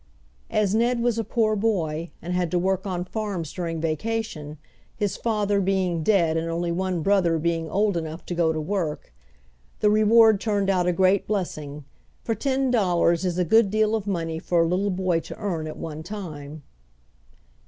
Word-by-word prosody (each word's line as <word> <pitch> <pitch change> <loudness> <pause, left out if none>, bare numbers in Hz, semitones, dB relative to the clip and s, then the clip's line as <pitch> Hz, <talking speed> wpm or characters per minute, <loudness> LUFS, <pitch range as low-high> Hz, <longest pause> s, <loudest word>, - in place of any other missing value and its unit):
As 210 -2 +1
Ned 235 +2 +2
was 235 -1 +1
a - - 0
poor 215 0 +1
boy, 170 -7 -1
and 175 +1 -3
had 180 -1 0
to 180 - 0
work 190 +2 0
on 180 -2 -2
farms 190 -6 -4
during 165 -3 -3
vacation, 155 -2 -3 0.4
his 205 -3 -1
father 205 -3 0
being 185 -3 0
dead 165 -3 +2
and 165 +1 -2
only 170 +1 -1
one 180 -1 -1
brother 185 -4 +3
being 165 0 -1
old 205 +1 +1
enough 160 0 -5
to - - -4
go 170 -2 +2
to 160 - -2
work, 155 - -3 0.7
the 210 - +3
reward 215 0 +5
turned 200 -3 +1
out 180 -2 +1
a - - +4
great 185 +2 +2
blessing, 150 -8 -4 0.4
for 225 - 0
ten 265 +3 0
dollars 175 -6 +2
is 180 -2 -1
a 180 - +1
good 220 +4 +4
deal 215 +1 +2
of 215 -2 -2
money 165 -4 -2
for 170 0 +2
a - - +1
little 185 +4 0
boy 185 -3 0
to - - -9
earn 170 -7 -3
at 155 - -7
one 155 -1 -6
time. 155 -6 -8
185 Hz, 185 wpm, -24 LUFS, 165-210 Hz, 0.7 s, reward